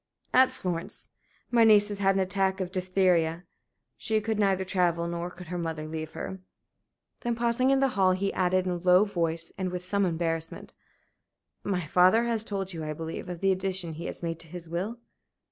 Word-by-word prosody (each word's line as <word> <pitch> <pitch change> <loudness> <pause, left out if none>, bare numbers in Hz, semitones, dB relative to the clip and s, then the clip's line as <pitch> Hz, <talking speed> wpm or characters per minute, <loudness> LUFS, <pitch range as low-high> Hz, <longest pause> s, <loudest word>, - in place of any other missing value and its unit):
"At 255 0 +6
Florence. 170 -2 -4 0.4
My 235 -1 +5
niece 210 -2 +6
has 205 -1 -5
had 195 -1 +3
an 195 - +2
attack 190 0 0
of 185 -1 -3
diphtheria. 180 -3 +1 0.5
She 220 -2 0
could 215 0 -2
neither 190 -2 +2
travel 175 -2 +1
nor 170 +1 -3
could 180 -1 -12
her 180 0 -3
mother 160 -2 -4
leave 155 0 -5
her." 190 - -6 0.8
Then 240 -1 -1
pausing 235 +2 +1
in 270 0 +3
the 270 - +4
hall, 190 -6 +3
he 195 +2 -1
added 185 0 +1
in 185 - 0
a 175 - -1
low 180 +2 +5
voice, 165 -4 -2
and 185 -1 -1
with 180 0 -5
some 200 +2 +1
embarrassment: 165 -2 -2 0.9
"My 180 -4 -1
father 185 +8 +5
has 230 -2 -1
told 195 -3 -3
you, 165 -2 -5
I 155 0 -3
believe, 165 +3 -6
of 175 -2 -6
the 195 0 +3
addition 185 -3 -1
he 160 +2 -7
has - - -7
made 165 -1 -3
to 165 - -6
his 170 +1 -9
will?" 185 +8 -3
185 Hz, 195 wpm, -28 LUFS, 170-200 Hz, 0.9 s, At